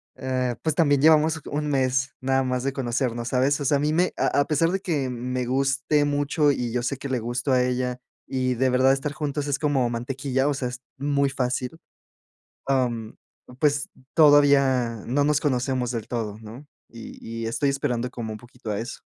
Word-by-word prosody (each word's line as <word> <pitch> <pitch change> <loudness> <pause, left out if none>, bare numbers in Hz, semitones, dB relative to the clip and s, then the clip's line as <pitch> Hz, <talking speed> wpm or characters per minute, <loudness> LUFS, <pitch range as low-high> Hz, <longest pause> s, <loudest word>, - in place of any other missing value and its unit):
eh, 130 -2 -1
pues 160 -2 0
también 145 -4 +3
llevamos 155 +1 +5
un 150 +1 -3
mes 130 -1 +1
nada 135 0 +1
más 125 -1 -1
de 135 0 -1
conocernos, 120 -2 -2
¿sabes? 135 +3 +2
O - - -2
sea, 140 +2 +3
a - - -2
mí 150 +1 +1
me 180 +2 +2
a 145 - +2
a - - +1
pesar 160 +2 +2
de 195 - 0
que 145 -8 -1
me 125 +1 -3
guste 135 +3 +1
mucho 145 +1 +2
y 125 -4 -2
yo 125 - -1
sé 135 +2 -2
que 140 - -6
le 130 -2 0
gusto 120 +4 -2
a 125 -1 +4
ella, 125 0 -1 0.3
y 130 -1 -1
de 130 +2 +2
verdad 130 +1 +4
estar 140 +2 -3
juntos 145 -1 -3
es 140 - 0
como 140 -5 +1
mantequilla, 130 +3 -1
o - - +1
sea, 135 -2 -2
es 125 +1 -8 0.2
muy 140 0 +1
fácil, 125 +4 -2 0.9
mm, 120 -5 0 0.5
pues 145 -1 +1 0.3
todavía 140 -7 +4
no 140 +4 +1
nos 150 0 +2
conocemos 130 -3 0
del 115 -3 -5
todo, 110 -4 -3
¿no?, 115 +7 -11 0.2
y 115 -1 -10 0.3
y - - -2
estoy 115 +5 0
esperando 125 -3 -1
como 115 -3 -5
un 110 - -7
poquito 120 0 -10
a 100 - -1
eso. 120 - -7
130 Hz, 195 wpm, -24 LUFS, 125-145 Hz, 0.9 s, llevamos